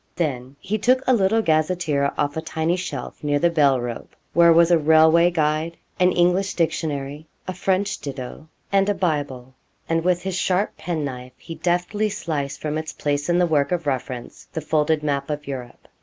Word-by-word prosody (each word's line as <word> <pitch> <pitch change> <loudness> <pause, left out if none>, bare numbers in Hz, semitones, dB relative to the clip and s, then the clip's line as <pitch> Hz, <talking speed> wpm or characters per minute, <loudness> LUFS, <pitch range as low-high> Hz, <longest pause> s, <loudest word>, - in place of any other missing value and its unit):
Then 135 -5 -3
he 210 +6 -2
took 255 +4 +3
a 255 - +4
little 220 0 +2
gazetteer 155 -3 +1
off 145 -1 0
a 160 - -2
tiny 160 +1 -1
shelf 150 -9 -6
near 145 -1 +1
the 170 +4 +2
bell 140 -5 +3
rope, 120 -1 -6 0.2
where 170 0 +6
was 170 +1 +5
a 170 - +6
railway 160 +2 +5
guide, 160 0 -1 0.2
an 180 0 +4
English 180 +3 +2
dictionary, 150 -3 -2 0.2
a 185 - -3
French 190 +2 0
ditto, 135 +2 -7 0.2
and 195 0 +3
a 205 - +1
Bible, 145 -8 -2 0.3
and 165 0 0
with 180 0 +1
his 190 0 -3
sharp 185 +2 0
penknife 140 -7 -4
he 165 - -9
deftly 180 +6 0
sliced 145 -8 -3
from 155 0 -2
its 155 - -6
place 145 +1 -2
in 175 - +3
the 180 - +4
work 150 -3 +1
of 175 -3 -1
reference 130 -3 -4
the 160 - -4
folded 155 0 +1
map 140 -1 -1
of 150 0 -4
Europe. 125 -3 -8
160 Hz, 185 wpm, -22 LUFS, 145-180 Hz, 0.3 s, where